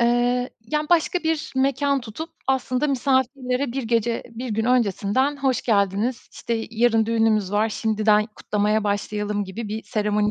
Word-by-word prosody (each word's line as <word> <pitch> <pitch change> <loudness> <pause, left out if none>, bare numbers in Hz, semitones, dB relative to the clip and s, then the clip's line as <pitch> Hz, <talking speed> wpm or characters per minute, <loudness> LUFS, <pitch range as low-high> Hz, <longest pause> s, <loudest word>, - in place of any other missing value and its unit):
Eee, 245 +1 +2
yani, 300 +7 -2
başka 345 +1 +3
bir 320 -3 -2
mekân 275 +1 +2
tutup 245 +8 -7 0.2
aslında 260 +1 +1
misafirlere 260 -1 0
1 270 +1 -2
gece, 230 0 0
1 240 +2 -6
gün 220 +1 0
öncesinden 250 +3 +1
"Hoş 270 -2 0
geldiniz, 210 +2 0
işte, 225 -1 -3
yarın 225 -1 +2
düğünümüz 220 -4 +2
var, 210 +2 +2
şimdiden 215 -1 +2
kutlamaya 210 +1 0
başlayalım." 205 0 -1
gibi 205 +3 -6
bir 215 +2 -4
seremoni 210 0 0
230 Hz, 145 wpm, -23 LUFS, 210-260 Hz, 0.2 s, başka